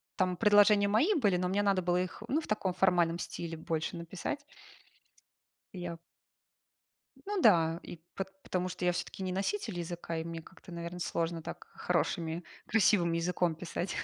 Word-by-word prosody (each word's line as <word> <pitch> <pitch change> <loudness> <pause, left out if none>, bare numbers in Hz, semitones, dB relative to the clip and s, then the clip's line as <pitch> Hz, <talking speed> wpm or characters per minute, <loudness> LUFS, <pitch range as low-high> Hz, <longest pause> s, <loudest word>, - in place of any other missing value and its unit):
там 185 -1 +1
предложения 205 -1 +6
мои 240 - +4
были, 205 - +3
но 180 - 0
мне 200 +2 +2
надо 195 -2 +2
было 180 +1 +2
их, 185 +4 -5
ну, 300 +6 +1
в - - -10
таком 195 -4 0
формальном 175 -2 +3
стиле 165 -2 -5
больше 160 0 -2
написать. 180 - -4 1.3
И 185 - -7
я 170 -1 -4 1.3
Ну 405 -1 -1
да. 165 - +5
И - - -8 0.2
пот 195 - -2 0.2
потому 185 0 -1
что 180 0 -4
я 180 - +4
всё-таки 185 +2 -4
не 185 - -2
носитель 195 - -2
языка 170 -1 -4
и 160 - -2
мне 165 0 -5
как-то, 185 +2 -15
наверно, 170 +1 -5
сложно 165 -1 -1
так - - -8
хорошими, 165 +1 -1 0.2
красивым 205 -5 +4
языком 170 0 +1
писать. 175 +2 -4
180 Hz, 165 wpm, -32 LUFS, 170-200 Hz, 1.3 s, предложения